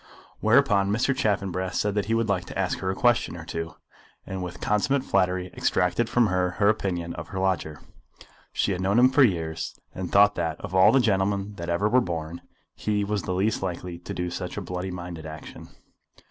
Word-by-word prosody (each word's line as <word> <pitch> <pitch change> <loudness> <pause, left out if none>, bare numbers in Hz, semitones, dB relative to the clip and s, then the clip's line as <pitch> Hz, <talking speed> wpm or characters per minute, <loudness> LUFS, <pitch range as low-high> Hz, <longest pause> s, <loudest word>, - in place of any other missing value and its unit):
Whereupon 100 -1 +4
Mr. 120 +6 +1
Chaffanbrass 100 -7 -1
said 105 -1 0
that 105 -1 0
he 115 +2 +1
would 115 -1 +1
like 95 -3 0
to - - -8
ask 95 -1 -1
her 95 - -2
a 95 - -1
question 120 -7 +2
or 85 - -9
two, 80 0 -5 0.5
and 95 -1 -5
with 90 -1 -6
consummate 125 +6 +1
flattery 90 -3 0
extracted 90 +6 +1
from 120 -1 +3
her 90 -3 +1
her 100 -1 +4
opinion 90 -5 -1
of - - -7
her 95 - -7
lodger. 90 -6 -1 0.7
She - - 0
had 90 -1 -2
known 100 +3 +2
him 125 +1 +7
for 145 +2 +4
years, 80 -9 0
and 90 -2 -5
thought 100 +1 +6
that, 80 -3 -2
of - - -7
all 95 0 +6
the 135 - +5
gentlemen 100 -2 +1
that 85 0 -5
ever 85 +5 +1
were 125 +4 +4
born, 85 -3 -4 0.3
he 105 -1 -1
was 105 0 -1
the 90 +3 -3
least 105 +4 0
likely 90 -2 -4
to 85 - -9
do 90 0 -2
such 90 +2 -5
a - - 0
bloody 90 0 -4
minded 85 -3 -7
action. 80 0 -10
95 Hz, 205 wpm, -26 LUFS, 90-105 Hz, 0.7 s, him